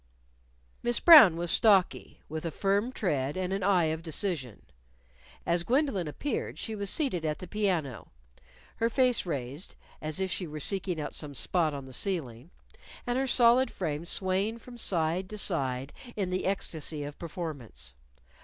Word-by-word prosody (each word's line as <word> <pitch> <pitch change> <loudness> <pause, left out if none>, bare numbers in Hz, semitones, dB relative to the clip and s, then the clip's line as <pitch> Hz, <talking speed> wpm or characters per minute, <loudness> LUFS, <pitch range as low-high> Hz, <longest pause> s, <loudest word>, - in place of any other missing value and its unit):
Miss 240 0 +1
Brown 290 - +9
was 170 0 0
stocky, 200 -5 +2
with 155 +1 -5
a 165 - -2
firm 200 +8 0
tread 145 - -2
and 185 0 -2
an 195 - -2
eye 185 -2 +3
of 160 - -6
decision. 160 - -2 0.8
As 170 0 +1
Gwendolyn 240 - 0
appeared, 245 - -4
she 220 - -5
was 200 -2 -4
seated 260 - -1
at 155 -1 -1
the 185 - -8
piano, 175 - -2 0.7
her 230 - +1
face 250 -5 +1
raised 140 +1 -5 0.3
(as 155 +3 -3
if 190 -1 -1
she 180 - -3
were 155 0 -7
seeking 185 0 +4
out 150 - -5
some 145 -2 -5
spot 160 +2 +1
on 140 -1 -7
the 130 - -12
ceiling), 145 - -3 0.6
and 245 0 0
her 270 - 0
solid 245 +1 +4
frame 155 -4 -4
swaying 190 +5 -1
from 240 +1 -13
side 180 -4 -1
to 215 - -7
side 135 -8 -2 0.2
in 190 -3 -2
the 185 +1 -1
ecstasy 160 -5 -2
of 145 0 -8
performance. 150 - -7
180 Hz, 165 wpm, -29 LUFS, 150-205 Hz, 0.8 s, Brown